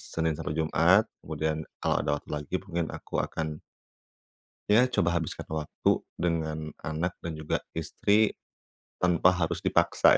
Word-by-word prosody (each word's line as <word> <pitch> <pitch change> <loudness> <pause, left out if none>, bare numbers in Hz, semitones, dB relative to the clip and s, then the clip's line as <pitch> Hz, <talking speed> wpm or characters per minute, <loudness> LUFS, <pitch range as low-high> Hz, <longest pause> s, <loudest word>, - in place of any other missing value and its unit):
Senin 80 -1 -1
sampai 75 -2 -3
Jumat, 85 +7 +4
kemudian 80 0 -2 0.2
kalau - - +2
ada 75 - -1
waktu - - -22
lagi 75 +4 -5
mungkin 85 -4 -2
aku - - -5
akan 80 -1 -3 1.1
ya, 120 +4 +6
coba 85 -9 +1
habiskan 80 - -4
waktu 75 -1 0 0.2
dengan 80 -2 -1
anak 80 +3 -3
dan 85 -2 -5
juga 80 -1 -1 0.2
istri 100 +6 +2 0.7
tanpa 90 0 +4
harus 85 -2 0
dipaksa - - +4
80 Hz, 135 wpm, -28 LUFS, 80-90 Hz, 1.1 s, ya